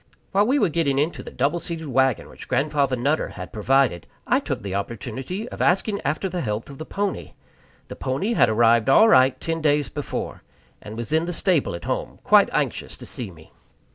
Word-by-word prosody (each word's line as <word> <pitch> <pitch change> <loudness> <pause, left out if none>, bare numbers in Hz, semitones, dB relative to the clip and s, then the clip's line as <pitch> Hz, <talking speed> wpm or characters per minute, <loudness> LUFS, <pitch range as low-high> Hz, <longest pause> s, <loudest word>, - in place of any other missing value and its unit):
While 200 +2 +3
we 270 +4 +3
were 205 -10 +3
getting 150 -4 0
into 150 +4 0
the - - -9
double 145 +6 0
seated 165 -1 -6
wagon 130 -3 +1
which - - -12
Grandfather 140 -2 +1
Nutter 140 +6 0
had 90 0 -9
provided, 115 -5 +1 0.2
I - - +3
took - - -4
the 100 -2 -4
opportunity 125 - -4
of - - -7
asking 200 +3 +1
after 155 +6 -1
the 180 -1 -3
health 110 +1 -3
of 140 - -12
the 155 - -7
pony. 200 -1 -3 0.5
The - - -8
pony 140 - -1
had 120 - +4
arrived 115 +2 +4
all 220 +11 +7
right 130 - +5
ten 165 0 -2
days 150 -1 +2
before, 145 -1 -5 0.4
and 105 +1 -9
was 120 +5 -4
in 160 +1 +2
the 175 - -3
stable 170 - +1
at 85 - -8
home, - - -3
quite - - +5
anxious - - -2
to - - -9
see 115 -5 -4
me. 80 -3 -16
140 Hz, 200 wpm, -23 LUFS, 120-170 Hz, 0.5 s, all